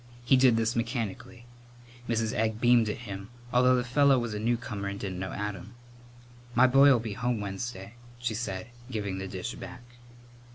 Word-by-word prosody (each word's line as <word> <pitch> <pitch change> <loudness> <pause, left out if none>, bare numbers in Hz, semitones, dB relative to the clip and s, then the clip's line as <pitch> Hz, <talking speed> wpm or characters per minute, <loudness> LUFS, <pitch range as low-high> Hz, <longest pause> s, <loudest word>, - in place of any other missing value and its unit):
He 135 - +5
did 130 -3 +5
this 115 0 0
mechanically. 115 0 -4 0.6
Mrs. 115 -1 0
Egg 110 0 0
beamed 120 -2 +4
at 115 +3 -5
him, 100 -1 -7 0.2
although 125 +1 +5
the 125 - +1
fellow 135 +2 +4
was 120 -3 -2
a 105 - -3
newcomer 110 -3 -2
and 100 0 -4
didn't 95 -2 -4
know 95 0 -4
Adam. 105 +2 -5 0.8
"My 125 - +6
boy'll 135 +1 +6
be 110 -2 -5
home 120 +2 -1
Wednesday," 100 0 -5 0.2
she 120 -2 -2
said, 105 -2 -4 0.2
giving 100 -5 -3
the 95 - -4
dish 95 +5 -5
back. 125 -1 -9
115 Hz, 170 wpm, -28 LUFS, 100-120 Hz, 0.8 s, My